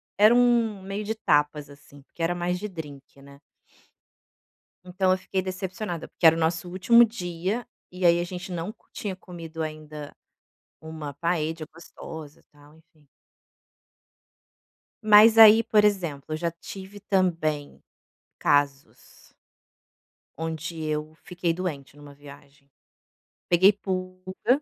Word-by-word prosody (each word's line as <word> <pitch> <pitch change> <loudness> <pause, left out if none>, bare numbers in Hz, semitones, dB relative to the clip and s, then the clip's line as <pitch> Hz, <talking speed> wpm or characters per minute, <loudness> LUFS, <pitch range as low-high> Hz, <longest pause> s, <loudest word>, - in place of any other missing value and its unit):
era 210 +3 +6
um 235 -4 +3
meio 195 +2 -5
de 220 +2 -3
tapas 150 -6 +1
assim 145 0 -17
porque 165 - -13
era 170 +1 0
mais 175 +1 -2
de 210 - -4
drinque, 145 -6 -10
né. 140 0 -16 1.5
Então 185 +1 +1
eu - - +3
fiquei 190 +1 -3
decepcionada 185 -1 -5
porque 170 - +1
era 160 0 +7
o - - -4
nosso 165 +1 -1
último 235 +6 +5
dia, 190 +1 -4 0.2
e 180 0 -6
aí 170 0 +5
a - - -1
gente 180 +1 -7
não 175 +5 -5 0.2
tinha 195 -3 -5
comido 165 -3 -8
ainda 155 -1 -8 0.7
uma 160 -2 -8
paella 160 0 -2
gostosa, 160 -2 -11
tal 145 +1 -20
enfim. 160 -2 -27 2.0
Mas 215 +1 +7
aí 220 0 +9
por 210 -2 +3
exemplo, 170 -9 0
eu - - -1
já 170 +1 -2
tive 190 +4 -11
também 165 -7 -1 0.6
casos 145 -1 -1 1.0
Onde 160 0 -5
eu 155 0 -3
fiquei 175 -1 -2
doente 150 -6 -5
em - - -16
uma 145 -1 -12
viagem, 140 0 -16 0.8
peguei 185 +3 +6
pulga, 185 +5 -2
170 Hz, 130 wpm, -25 LUFS, 155-190 Hz, 2.0 s, aí